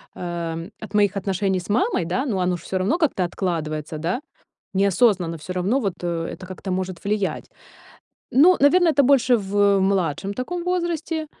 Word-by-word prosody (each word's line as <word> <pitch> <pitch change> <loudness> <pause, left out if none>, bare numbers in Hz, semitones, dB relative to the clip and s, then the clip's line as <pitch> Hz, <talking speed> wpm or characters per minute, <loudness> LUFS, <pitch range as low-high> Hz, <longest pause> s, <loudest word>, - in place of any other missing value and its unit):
э, 170 -1 -4
от 200 - -10
моих 205 -1 +2
отношений 195 0 0
с 175 - -11
мамой, 210 -4 +1
да, 185 - -1
ну 225 -8 -1
оно 180 -1 0
ж 165 - -15
всё 190 - -3
равно 195 - +1
как-то 305 - +1
откладывается, 160 -4 -3
да? 170 - -2 0.5
Неосознанно 190 -3 +2
всё 170 +4 -7
равно 190 +9 +1
вот, 200 -8 -2
э, 170 -1 -2
это 185 - -10
как-то 185 +1 -6
может 185 -1 -4
влиять. 205 -1 -2 0.8
Ну, 340 +8 +6
наверное, 330 +4 +5
это 280 - +4
больше 255 -2 +4
в 200 -1 +2
младшем 190 0 0
таком 340 +9 -4
возрасте, 340 -3 -2
195 Hz, 170 wpm, -22 LUFS, 180-250 Hz, 0.8 s, Ну